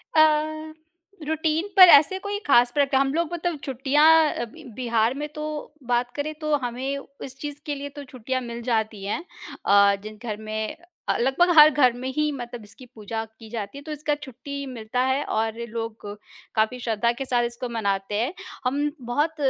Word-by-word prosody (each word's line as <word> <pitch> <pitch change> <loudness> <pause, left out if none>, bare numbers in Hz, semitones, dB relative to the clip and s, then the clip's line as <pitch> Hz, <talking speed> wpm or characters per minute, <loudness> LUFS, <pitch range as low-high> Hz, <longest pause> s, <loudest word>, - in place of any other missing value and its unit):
अ, 310 0 +3 0.5
routine 320 +3 0
पर 370 -2 +11
ऐसे 300 +5 +7
कोई 405 +1 -3
खास 245 -3 +5
प्रक 280 0 +1
हम 270 +1 +2
लोग 335 +1 -1
मतलब 345 -3 -2
छुट्टियाँ 270 +3 +2 0.3
अ, - - -3
ब 255 +1 -13
बिहार 235 -2 +1
में 300 - -2
तो 305 0 -5 0.5
बात 245 0 +1
करें, 300 +2 -3
तो 305 -1 0
हमें 260 +1 -3 0.3
इस 265 0 -10
चीज़ 290 +1 -6
के 295 - -2
लिए 285 0 -6
तो 285 - -6
छुट्टियाँ 255 0 -3
मिल 235 -1 -6
जाती 220 -4 -1
हैं। 260 - -2 0.4
अ, 200 0 +6
जिन 215 0 -9
घर 215 -3 -3
में 215 0 -4
अ - - -28 0.3
अ, - - -2
लगभग 270 +9 +3
हर 300 0 +11
घर 260 -5 +4
में 255 - -4
ही 300 0 +1
मतलब 240 -3 -7
इसकी 220 +5 -13
पूजा 225 +1 -4 0.2
की 225 -2 -12
जाती 215 +2 -5
है, - - -8
तो 310 - -7
इसका 300 0 -1
छुट्टी 280 0 -7
मिलता 245 -2 -4
है 265 +2 +1
और 220 0 -1
लोग 225 -1 -6 0.5
काफ़ी 220 +3 +1
श्रद्धा 235 -1 +1
के 260 +3 -5
साथ 245 -2 +1
इसको 240 +1 -4
मनाते 200 -3 -1
हैं। 275 +9 -1 0.3
हम 285 +3 +1 0.2
बहुत 300 +5 +1
260 Hz, 190 wpm, -24 LUFS, 230-295 Hz, 0.5 s, पर